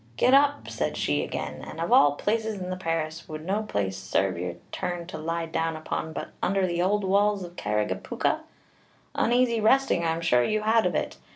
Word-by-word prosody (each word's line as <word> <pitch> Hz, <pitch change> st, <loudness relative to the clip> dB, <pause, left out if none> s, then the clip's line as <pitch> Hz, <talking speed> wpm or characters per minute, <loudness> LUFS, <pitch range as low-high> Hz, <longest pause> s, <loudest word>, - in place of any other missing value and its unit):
"'Get 255 Hz, -, +4 dB
up,' 285 Hz, +1 st, +4 dB
said -, -, -2 dB
she -, -, +1 dB
again: -, -, -5 dB
'and 160 Hz, -, -8 dB
of 170 Hz, -, -2 dB
all 145 Hz, 0 st, +6 dB
places 220 Hz, +5 st, -1 dB
in 180 Hz, 0 st, -4 dB
the -, -, -1 dB
parish 165 Hz, -2 st, -3 dB
would 155 Hz, 0 st, -7 dB
no 200 Hz, +4 st, 0 dB
place 100 Hz, -, -2 dB
sarve 95 Hz, 0 st, 0 dB
your 90 Hz, 0 st, -4 dB, 0.2 s
turn 175 Hz, -2 st, -3 dB
to 165 Hz, -2 st, -7 dB
lie 165 Hz, +1 st, -2 dB
down 165 Hz, 0 st, -1 dB
upon 155 Hz, 0 st, -4 dB
but -, -, -5 dB
under 195 Hz, 0 st, +2 dB
the 175 Hz, -1 st, -1 dB
ould 205 Hz, +3 st, +1 dB
walls 200 Hz, +1 st, +2 dB
of 175 Hz, 0 st, -9 dB
Carrigapooka? 105 Hz, -, -1 dB, 0.7 s
uneasy 240 Hz, -1 st, +2 dB
resting 225 Hz, -5 st, +3 dB
I 165 Hz, -1 st, +1 dB
am 165 Hz, -, -5 dB
sure 125 Hz, -7 st, +3 dB
you 215 Hz, -, 0 dB
had 220 Hz, +1 st, +3 dB
of -, -, -2 dB
it.' -, -, -2 dB
175 Hz, 200 wpm, -26 LUFS, 155-210 Hz, 0.7 s, all